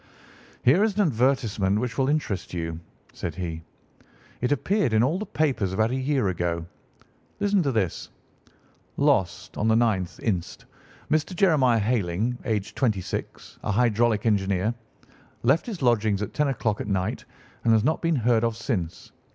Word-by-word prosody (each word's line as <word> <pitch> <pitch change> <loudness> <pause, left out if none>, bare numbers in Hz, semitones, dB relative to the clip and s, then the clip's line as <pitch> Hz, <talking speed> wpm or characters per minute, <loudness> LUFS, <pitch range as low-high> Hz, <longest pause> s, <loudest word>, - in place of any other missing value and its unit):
"Here 160 +11 +5
is 215 -3 +1
an 210 - +2
advertisement 120 - +1
which 120 -1 -3
will 135 +2 +1
interest 125 -12 -2
you," 80 -1 -3 0.3
said - - -5
he. 85 -3 -4 0.8
"It 125 - 0
appeared 180 - +1
in 110 +1 +4
all 155 +9 +1
the 215 - -5
papers 130 -12 0
about 110 +4 +1
a - - -1
year 130 -4 0
ago. 85 -2 -2 0.7
Listen 205 -1 +2
to 140 -5 0
this: 105 -8 -1 0.9
'Lost, 105 - +1
on 105 - +1
the 110 - +4
9th 110 -6 +1
inst., 90 -6 -3 0.5
Mr. 155 +4 +1
Jeremiah 150 - +4
Hayling, 110 0 0
aged 105 -3 -2
twenty 110 -7 +1
six, - - -6
a - - -1
hydraulic 115 0 +2
engineer. 100 0 +1 0.7
Left 135 - +3
his 200 - -5
lodgings 110 -4 +2
at 105 - -6
ten 150 -1 +1
o'clock 110 -5 -1
at - - -5
night, 100 +4 -2 0.4
and 115 - +3
has 110 -1 +4
not 155 +5 +1
been 165 -1 +1
heard 120 -2 +2
of 115 -1 0
since. 100 -9 -4
115 Hz, 160 wpm, -25 LUFS, 100-135 Hz, 0.9 s, Here